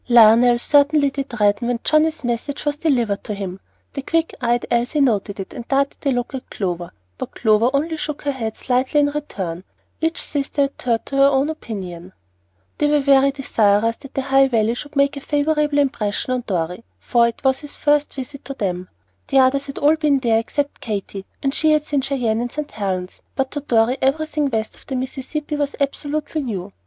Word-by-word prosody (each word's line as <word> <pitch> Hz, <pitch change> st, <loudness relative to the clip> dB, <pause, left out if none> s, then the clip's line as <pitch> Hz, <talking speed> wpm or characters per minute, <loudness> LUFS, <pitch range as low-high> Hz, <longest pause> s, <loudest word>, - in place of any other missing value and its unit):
LIONEL 235 Hz, +1 st, +7 dB
certainly 285 Hz, +2 st, +3 dB
did 270 Hz, -4 st, -5 dB
redden 205 Hz, +3 st, +2 dB
when 245 Hz, -1 st, 0 dB
Johnnie's 310 Hz, 0 st, +2 dB
message 245 Hz, +5 st, -3 dB
was 295 Hz, 0 st, 0 dB
delivered 240 Hz, -10 st, 0 dB
to 210 Hz, -, -4 dB
him. 195 Hz, -2 st, -5 dB, 0.3 s
The 275 Hz, -, -3 dB
quick 330 Hz, +4 st, 0 dB
eyed 240 Hz, 0 st, +1 dB
Elsie 240 Hz, +5 st, +1 dB
noted 210 Hz, -7 st, +1 dB
it 195 Hz, -, -6 dB
and 235 Hz, -, -8 dB
darted 275 Hz, +1 st, 0 dB
a -, -, +4 dB
look 245 Hz, 0 st, -2 dB
at 265 Hz, -, -6 dB
Clover, 175 Hz, -3 st, -3 dB, 0.3 s
but -, -, -6 dB
Clover 220 Hz, +1 st, +3 dB
only 315 Hz, +4 st, 0 dB
shook 300 Hz, -1 st, -4 dB
her 285 Hz, -, 0 dB
head 225 Hz, -5 st, -4 dB
slightly 255 Hz, +3 st, +1 dB
in 290 Hz, 0 st, +3 dB
return. 190 Hz, -, -4 dB, 0.4 s
Each 325 Hz, +1 st, 0 dB
sister 285 Hz, 0 st, 0 dB
adhered 245 Hz, -4 st, -1 dB
to 275 Hz, -, -4 dB
her 275 Hz, -, +6 dB
own 280 Hz, +2 st, +2 dB
opinion. 185 Hz, -, -7 dB, 0.7 s
They 295 Hz, -, +3 dB
were 295 Hz, 0 st, +4 dB
very 275 Hz, -1 st, +5 dB
desirous 230 Hz, -5 st, +2 dB
that 275 Hz, -2 st, -13 dB
the 270 Hz, -, 0 dB
High 270 Hz, 0 st, +4 dB
Valley 230 Hz, -3 st, +1 dB
should 290 Hz, +4 st, -8 dB
make 280 Hz, +1 st, +2 dB
a -, -, -6 dB
favorable 295 Hz, 0 st, +1 dB
impression 255 Hz, -4 st, 0 dB
on 250 Hz, -1 st, -2 dB
Dorry, 180 Hz, +2 st, -2 dB, 0.2 s
for 235 Hz, -1 st, +3 dB
it 230 Hz, -, -6 dB
was 265 Hz, -1 st, +2 dB
his 295 Hz, -1 st, -9 dB
first 295 Hz, -1 st, +1 dB
visit 270 Hz, +1 st, -7 dB
to 275 Hz, -, -6 dB
them. 180 Hz, -5 st, -3 dB, 0.4 s
The 270 Hz, -, +1 dB
others 270 Hz, +2 st, +4 dB
had 275 Hz, -, -7 dB
all 300 Hz, +2 st, +4 dB
been 300 Hz, -3 st, +3 dB
there 230 Hz, -4 st, +2 dB
except 285 Hz, +6 st, -3 dB
Katy, 200 Hz, -5 st, -5 dB, 0.2 s
and 275 Hz, 0 st, +1 dB
she 310 Hz, +1 st, +3 dB
had 305 Hz, 0 st, +1 dB
seen 290 Hz, -2 st, 0 dB
Cheyenne 245 Hz, -5 st, 0 dB
and 245 Hz, 0 st, -3 dB
St. 300 Hz, -1 st, -5 dB
Helen's, 190 Hz, -3 st, -3 dB
but 270 Hz, -1 st, -1 dB
to 290 Hz, -, -3 dB
Dorry 245 Hz, -2 st, +2 dB
everything 300 Hz, +1 st, +1 dB
west 220 Hz, -3 st, -2 dB
of -, -, -20 dB
the 265 Hz, -, -3 dB
Mississippi 270 Hz, +4 st, -4 dB
was 290 Hz, -1 st, -1 dB
absolutely 295 Hz, +2 st, -2 dB
new. 200 Hz, -7 st, -5 dB
265 Hz, 200 wpm, -21 LUFS, 225-290 Hz, 0.7 s, LIONEL